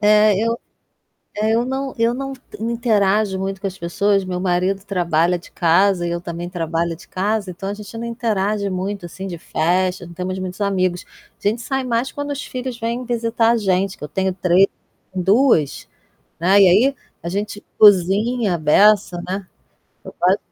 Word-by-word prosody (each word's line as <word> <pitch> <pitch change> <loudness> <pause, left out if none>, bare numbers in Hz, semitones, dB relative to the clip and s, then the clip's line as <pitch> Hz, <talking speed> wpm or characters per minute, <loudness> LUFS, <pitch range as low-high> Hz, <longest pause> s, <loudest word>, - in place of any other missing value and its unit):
É, 210 0 +5
eu 230 +1 -1 0.8
é, 215 +1 +1
eu 235 +1 +2
não 265 +1 -3
eu 230 +1 +3
não 270 +1 -4 0.3
não 230 +1 -2
interajo 210 -4 +1
muito 195 0 -3
com 200 - -3
as 190 0 -5
pessoas, 195 +3 +1
meu 180 -1 -3
marido 185 +2 0
trabalha 175 -2 +1
de - - -16
casa 175 +1 +2
e - - -2
eu 170 0 -2
também 175 -1 -6
trabalho 165 -1 -2
de 165 - -16
casa, 200 +1 -1
então 195 +2 -6
a 200 - -2
gente 210 +2 -10
não 235 - -5
interage 210 -3 -1
muito 190 0 -3
assim 190 +3 -8
de 175 - -5
festa, 180 +2 0
não 170 - -11
temos 185 +2 -4
muitos 185 +2 -6
amigos. 185 -3 0 0.4
A 205 - +4
gente 225 +3 -1
sai 265 +1 -2
mais 245 +1 -1
quando 285 0 -5
os 285 0 -4
filhos 250 -1 -5
vêm 235 +2 -3
visitar 230 -1 +1
a - - +2
gente, 195 -2 0
que - - -8
eu - - -5
tenho 190 +4 -1
3 185 +1 +4 0.5
2, 190 - +2 0.5
né. 190 +4 +4
E 195 - +8
aí, 250 +10 +4 0.3
a 170 - -4
gente 205 +2 -4 0.2
cozinha 205 +2 +4
à - - -2
beça, 180 +3 +4
né. 190 +1 -3 0.6
Eu - - -9
quase 185 +3 +3
195 Hz, 185 wpm, -20 LUFS, 180-225 Hz, 0.8 s, E